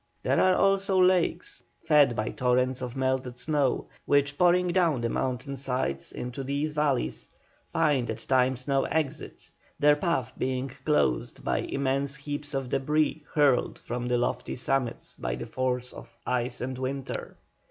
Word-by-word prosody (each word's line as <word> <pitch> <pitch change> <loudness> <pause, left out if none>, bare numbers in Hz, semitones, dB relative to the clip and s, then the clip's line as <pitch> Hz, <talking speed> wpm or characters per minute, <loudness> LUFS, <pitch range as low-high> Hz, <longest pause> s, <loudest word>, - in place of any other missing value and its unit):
There - - +2
are 185 0 +5
also 195 -1 +3
lakes 180 -1 +2 0.2
fed 145 -5 +5
by 110 - -1
torrents 125 +1 +1
of 125 0 -5
melted 130 -2 -1
snow 145 -1 0 0.2
which, 140 0 +3
pouring 180 +2 +4
down 170 -7 +2
the 115 - 0
mountain 130 +3 -2
sides 125 - -2
into 125 +2 -5
these 140 +3 -2
valleys, 150 -4 -1 0.4
find 145 -7 +1
at 110 - -2
times 130 0 +2
no 135 -1 +2
exit, 155 -1 -3 0.3
their 145 0 +5
path 145 -6 -1
being 130 +1 -1 0.2
closed 65 - +1
by - - 0
immense 140 0 -1
heaps 145 +1 -5
of 135 -2 -2
débris 150 +4 +1
hurled 145 -4 +3
from 120 +1 -4
the 125 0 +2
lofty 125 +1 -1
summits 130 -1 -2
by - - -2
the 65 - -6
force 125 -1 -2
of - - -11 0.2
ice 125 0 -1
and 130 +1 -4
water. 135 +1 -4
135 Hz, 155 wpm, -28 LUFS, 125-150 Hz, 0.4 s, are